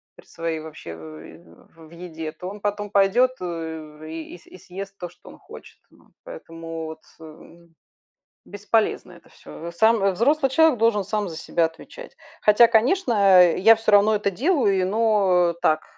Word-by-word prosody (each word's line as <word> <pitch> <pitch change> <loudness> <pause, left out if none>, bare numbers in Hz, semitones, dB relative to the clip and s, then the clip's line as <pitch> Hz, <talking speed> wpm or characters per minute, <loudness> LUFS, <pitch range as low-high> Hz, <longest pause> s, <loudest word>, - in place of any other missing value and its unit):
при - - -18
своей 165 -1 -5
вообще 155 - -10
в 80 - -15
еде, 165 -2 -8
то 180 +3 -8
он 205 +1 -10
потом 205 0 -4
пойдет 205 +6 +3
и 160 -1 -8
с - - -24
и - - -15
съест 195 +2 -10
то, 180 - -5
что 175 - -18
он - - -14
хочет - - -15
вот. - - -26
Поэтому 165 - -9
вот, 160 0 -10 0.2
э, 165 +2 -15 0.8
бесполезно 210 +2 -2
это - - -19
всё. 170 +1 -11
Сам 220 +4 +2
взрослый 270 - +1
человек 320 -2 +3
должен 220 -3 +1
сам 205 -1 -3
за 160 - -9
себя 170 - -1
отвечать. 165 - -11 0.2
Хотя, 210 +3 +5
конечно, 240 - +1 0.4
я 225 +5 +5
всё 225 -1 -1
равно 205 +1 +5
это 205 -1 -1
делаю, 230 - +1
и - - 0
но 190 -4 +1
так 155 -3 +1
185 Hz, 160 wpm, -22 LUFS, 165-220 Hz, 0.8 s, Хотя